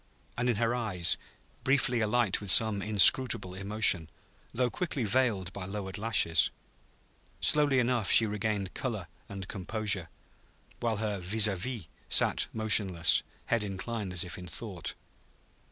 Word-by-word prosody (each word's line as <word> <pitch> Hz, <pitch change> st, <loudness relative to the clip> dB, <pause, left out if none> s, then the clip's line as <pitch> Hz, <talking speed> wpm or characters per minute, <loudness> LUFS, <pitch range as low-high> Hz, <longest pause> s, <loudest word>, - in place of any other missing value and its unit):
and 120 Hz, +1 st, -1 dB
in 120 Hz, -, +1 dB
her 115 Hz, +2 st, -1 dB
eyes, 100 Hz, -9 st, +1 dB, 0.5 s
briefly 135 Hz, -3 st, +1 dB
alight 110 Hz, -2 st, 0 dB
with 100 Hz, -, -6 dB
some 105 Hz, +1 st, +5 dB
inscrutable 105 Hz, 0 st, +3 dB
emotion, 95 Hz, -4 st, +3 dB, 0.4 s
though 125 Hz, +1 st, 0 dB
quickly 145 Hz, -1 st, -4 dB
veiled 105 Hz, -5 st, 0 dB
by 100 Hz, -, -7 dB
lowered 95 Hz, 0 st, -7 dB
lashes. 105 Hz, -7 st, +3 dB, 0.9 s
Slowly 145 Hz, -3 st, +2 dB
enough 120 Hz, -5 st, 0 dB
she 115 Hz, -, +6 dB
regained 105 Hz, -2 st, -3 dB
color 110 Hz, -9 st, -5 dB, 0.2 s
and 95 Hz, -2 st, -8 dB
composure, 100 Hz, -2 st, -2 dB, 0.7 s
while 115 Hz, -2 st, -2 dB
her 105 Hz, -2 st, -3 dB
vis 100 Hz, +4 st, +3 dB
à 100 Hz, -, -2 dB
vis 110 Hz, 0 st, -6 dB, 0.2 s
sat -, -, +2 dB
motionless, 100 Hz, -6 st, +3 dB, 0.2 s
head 115 Hz, -2 st, -1 dB
inclined 100 Hz, +1 st, -5 dB
as 90 Hz, 0 st, -1 dB
if 90 Hz, 0 st, -9 dB
in 90 Hz, -, -10 dB
thought. 90 Hz, 0 st, -3 dB
105 Hz, 135 wpm, -29 LUFS, 95-115 Hz, 0.9 s, she